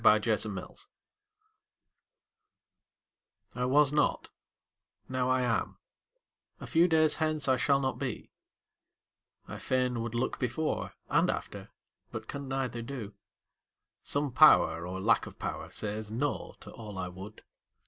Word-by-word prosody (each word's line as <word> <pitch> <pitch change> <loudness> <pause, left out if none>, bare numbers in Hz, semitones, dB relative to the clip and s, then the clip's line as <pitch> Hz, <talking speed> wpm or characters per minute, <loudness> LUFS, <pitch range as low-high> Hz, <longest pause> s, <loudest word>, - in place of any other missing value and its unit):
THE - - +7 0.3
MYSTERY - - -5 2.9
I 125 0 -1
was 145 +2 +4
not; 150 0 +1 0.8
now 130 0 -1
I 130 0 +3
am 120 -3 -1 0.8
a - - -7
few 170 +1 +4
days 155 -2 +4
hence 155 -3 0
I 130 - +4
shall 135 +2 +2
not 130 -2 -2
be; 125 -5 -5 1.2
I - - -7
fain 125 -2 0
would 115 0 -4
look 120 - -1
before 125 +6 -2
And - - +3
after, - - -4 0.4
but 110 0 -6
can 140 -1 -6
neither 130 -3 -2
do; 115 -4 -6 0.9
some 145 -1 0
Power 85 -7 +6
Or 95 +1 -5
lack 110 +4 +2
of - - -12
power - - -5
says 105 0 -4
"no" 130 +6 -2
to - - -10
all 105 -4 -9
I 90 -1 -3
would. 95 +4 -10
125 Hz, 130 wpm, -30 LUFS, 110-140 Hz, 2.9 s, THE